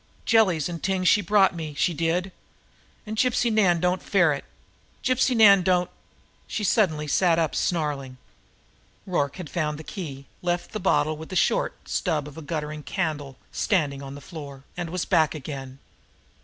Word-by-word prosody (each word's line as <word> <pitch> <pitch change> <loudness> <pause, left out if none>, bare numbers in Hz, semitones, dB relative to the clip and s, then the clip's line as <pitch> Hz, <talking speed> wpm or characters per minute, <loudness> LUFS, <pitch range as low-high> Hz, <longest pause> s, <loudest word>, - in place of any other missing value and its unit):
Jellies 195 -9 +3
an' 170 -1 -5
t'ings 185 0 0
she 205 - +5
brought 200 0 +4
me, 155 -4 -6
she 175 - +1
did. 170 +4 -1 0.7
An' 215 0 -5
Gypsy 240 0 +2
Nan 185 -6 +4
don't 180 +2 +1
ferret. 170 -8 +2 0.6
Gypsy 255 0 +2
Nan 200 -4 +7
don't 180 0 +1 0.3
" - - -35
She 215 - -3
sat 205 -1 +4
up 155 - -6
suddenly, - - -8
snarling. 155 -5 0 0.9
Rorke 145 -7 -1
had 180 -4 -7
found 150 -2 -2
the 160 - -9
key, 145 -5 -7 0.2
left 175 0 -2
the 215 - -4
bottle 155 -5 +1
with 160 +1 -9
the 185 - -6
short - - 0
stub 155 -6 -1
of 150 +1 -10
guttering 150 -2 -3
candle 150 -6 -3
standing 150 -10 0
on 135 0 -8
the 145 - -10
floor, 140 -3 -9
and 175 -2 -4
was 180 +1 -2
back 160 -1 +2
again. 135 -2 -7
170 Hz, 165 wpm, -25 LUFS, 150-190 Hz, 0.9 s, Nan